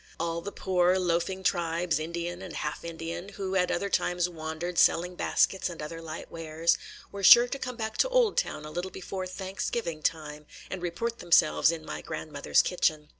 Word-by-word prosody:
All 170 0 -2
the 200 - -6
poor, 185 -1 +2
loafing 180 +1 0
tribes, 170 -2 +1
Indian 170 +2 -4
and 185 -4 -8
half 150 - -4
Indian, 170 +2 -6
who 195 -1 -4
at 180 -1 +2
other 200 +3 0
times 180 -2 +1
wandered, 165 +1 -4
selling 180 +2 +4
baskets 190 +1 +1
and 170 - -9
other 165 +2 -6
light 160 0 -8
wares, 165 +1 0 0.4
were 200 - -6
sure 240 +5 +9
to 275 +2 -5
come 250 -2 -4
back 220 -2 -4
to - - +3
Oldtown 470 - +1
a 150 - -8
little 175 +3 -3
before 185 0 -5
Thanksgiving 185 -2 -4
time 150 -2 -3 0.2
and 190 - -4
report 230 +7 -3
themselves 170 -2 +4
in 160 -2 -6
my - - -5
grandmother's 155 -3 0
kitchen. 155 -4 0
175 Hz, 175 wpm, -28 LUFS, 165-190 Hz, 0.4 s, sure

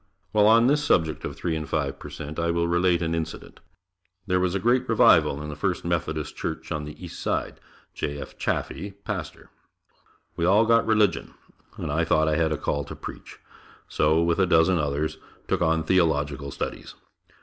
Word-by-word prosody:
While 105 -1 +4
on 115 +2 +6
this 145 +3 +3
subject 80 - +1
of - - -5
three 85 -2 -2
and 80 -1 -5
five 70 -3 -2
per - - -9
cent, 75 +1 -7
I 85 0 0
will 85 0 +1
relate 85 0 +2
an 80 0 -1
incident. 80 -1 -5 0.7
There 90 -1 +1
was 90 0 0
a - - +1
great 120 +5 +1
revival 70 +2 +4
in 75 - -6
the 75 - -6
First - - -2
Methodist 80 -3 -2
Church - - -5
on 75 -1 -2
the 75 - -9
East - - -9
Side, - - -2 0.3
J. 70 0 -4
F. - - -9
Chaffee, 100 0 -3
pastor. 95 -8 -6 0.8
We 85 - -3
all 100 +6 +5
got 115 +1 +3
religion, 105 -5 +1 0.4
and 75 - -4
I 80 +3 +1
thought 80 -1 +2
I 75 - +2
had 80 -1 +1
a 75 - 0
call 70 +1 -2
to - - -8
preach, - - -9 0.5
so 80 +2 +2
with 85 +2 +1
a 95 - +3
dozen 85 +1 +4
others, 75 +1 -2 0.3
took - - 0
on 80 -1 +2
theological 75 -5 +1
studies. - - -6
80 Hz, 190 wpm, -25 LUFS, 75-95 Hz, 0.8 s, on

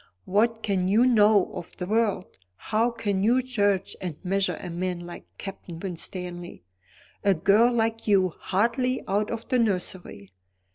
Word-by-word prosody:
What 225 +4 +1
can 190 -3 0
you 215 +6 +4
know 210 -5 +4
of 170 - -8
the 180 - -3
world? 205 - -1 0.2
How 225 - 0
can 210 -5 -2
you 245 +5 +3
judge 205 -6 0
and 175 -5 -4
measure 195 +1 0
a 180 - -7
man 180 0 -3
like 175 0 -10
Captain 190 -4 -8
Winstanley? 175 - -6 0.6
A 200 -2 +4
girl 205 +8 +4
like 225 -1 -1
you, 195 -3 +4
hardly 235 - -1
out 205 +2 0
of 230 -1 -5
the 255 - +2
nursery! 180 - -2
200 Hz, 150 wpm, -26 LUFS, 180-225 Hz, 0.6 s, you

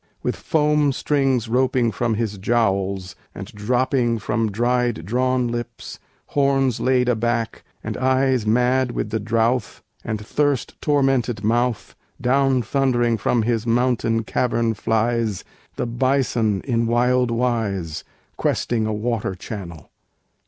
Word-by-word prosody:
With - - -1
foam 150 -2 +2
strings 135 -5 +1
roping 125 0 +2
from 115 +2 -1
his 105 -3 -3
jowls, 95 -4 0 0.2
and - - -6
dropping 120 +2 +1
From 110 +1 -1
dried 120 -4 0
drawn 125 +3 +1
lips, 120 0 -6 0.3
horns 135 -3 +1
laid 130 -1 +2
aback, 115 -1 -1 0.2
and - - -4
eyes 130 -3 +1
Mad 125 +2 +2
with 105 - -3
the 110 - 0
drouth, 115 +1 0 0.2
and 110 - -3
thirst 140 +5 -1
tormented 135 -6 +1
mouth, 120 +1 0 0.2
Down 130 0 +2
thundering 120 -1 +1
from 115 +2 +1
his 115 0 -1
mountain 115 -1 +1
cavern 115 0 0
flies 110 -1 0 0.3
The - - -2
bison 120 -4 +1
in 115 -3 0
wild 125 +1 +2
wise, 110 -9 -1 0.3
Questing 110 -2 0
a 110 - -1
water 105 -3 -2
channel. 85 -6 -8
120 Hz, 125 wpm, -22 LUFS, 110-130 Hz, 0.3 s, foam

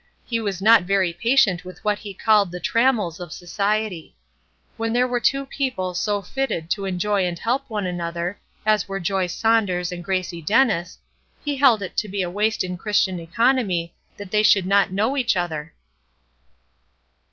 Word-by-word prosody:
He 230 -1 -1
was 195 -4 -3
not 225 +1 +7
very 185 -1 +1
patient 215 -2 +2
with 185 +3 -12
what 210 0 +1
he 205 - -8
called 210 -3 +3
the 180 - -6
"trammels" 220 -4 +1
of 175 -3 -8
society. 200 0 -2 0.6
When 225 -1 -2
there 250 +1 +3
were 245 -1 -1
two 275 +3 +1
people 255 -10 -3
so 205 +2 -1
fitted 200 -7 -3
to 200 -2 -1
enjoy 195 +2 0
and 175 -1 -4
help 255 +8 -2
one 210 -3 -2
another, 175 +1 -3 0.3
as 215 -2 +2
were 195 0 -4
Joy 190 +1 0
Saunders 185 -3 +1
and 175 -1 -6
Gracie 185 -2 -2
Dennis, 205 - +1 0.5
he 290 -1 -1
held 250 -7 +4
it 185 - -7
to 215 - 0
be 200 -1 -2
a 175 - -4
waste 210 +3 0
in 180 -1 -4
Christian 190 -3 +1
economy 185 -1 0 0.2
that 200 -2 -9
they 210 - +3
should 205 -3 +4
not 200 0 +3
know 215 +8 0
each 245 -8 +1
other. 165 -3 -3
200 Hz, 175 wpm, -22 LUFS, 180-225 Hz, 0.6 s, not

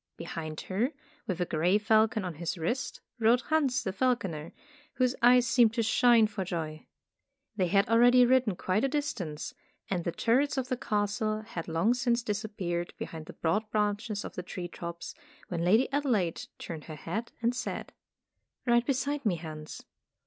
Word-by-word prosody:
Behind 155 -1 -5
her, 225 +10 -1 0.3
with 185 -4 -2
a 180 - +1
gray 175 +5 +2
falcon 215 0 +3
on 180 - -3
his 170 +1 -2
wrist, 235 +11 -2 0.2
rode 235 +2 +4
Hans 270 -3 +1
the 190 -4 -2
falconer, 195 -10 -1 0.4
whose 255 0 +2
eyes 245 +1 +6
seemed 230 -2 +4
to 230 - +1
shine 230 0 +5
for 205 -2 -3
joy. 160 -4 -5 0.7
They 185 -3 +1
had 195 +2 +3
al 230 +1 +4
ready 245 +1 +7
ridden 250 -5 +3
quite 185 +4 0
a - - +4
distance, 215 - -3 0.4
and 180 -3 0
the 170 - -1
turrets 265 - +1
of 260 -1 -2
the 255 - +1
castle 215 -1 -1
had 180 -6 -7
long 165 +8 +2
since 240 -1 +1
dis 210 0 -2
appeared 175 -5 -3
behind 160 -1 -7
the - - -9
broad 210 +7 0
branches 210 0 -1
of - - -7
the - - -4
tree 180 0 -6
tops, 170 0 -7 0.4
when 170 -1 -2
Lady 215 +9 +4
Adelaide 235 - 0
turned 160 -3 -7
her 155 - -7
head 225 +9 -4
and 235 +1 +1
said: 250 - -5 0.7
''Ride 240 -1 +3
beside 280 +2 0
me, 205 -6 +2
Hans." 155 -2 -8
215 Hz, 175 wpm, -29 LUFS, 175-245 Hz, 0.7 s, ready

